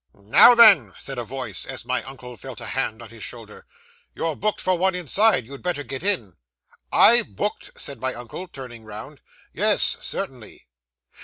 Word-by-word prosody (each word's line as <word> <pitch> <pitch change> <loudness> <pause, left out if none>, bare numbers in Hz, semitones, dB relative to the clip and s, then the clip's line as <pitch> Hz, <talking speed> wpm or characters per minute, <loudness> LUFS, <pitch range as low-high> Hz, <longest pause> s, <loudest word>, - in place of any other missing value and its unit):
'"Now 105 - +6
then!" 195 - +6
said 135 -2 -6
a - - -3
voice, 120 -5 -5
as - - -6
my - - -1
uncle 125 -2 -11
felt 130 -2 -10
a - - -8
hand 120 -4 -3
on 115 - -12
his 115 0 -13
shoulder, 110 -2 -7 0.5
"you're 165 -2 -3
booked 215 +6 -2
for 185 - 0
one 190 +1 0
inside. 180 - +2
You'd 140 +3 -10
better 175 -5 -3
get 135 -1 -7
in." 170 - 0 0.5
'"I 235 +1 +7
booked!" 210 -1 -6
said 140 -5 -5
my 130 0 -2
uncle, 120 +10 -8
turning 125 -7 -10
round. 110 +6 -10 0.3
'"Yes, - - +4 0.2
certainly." - - -7
135 Hz, 170 wpm, -22 LUFS, 115-180 Hz, 0.5 s, I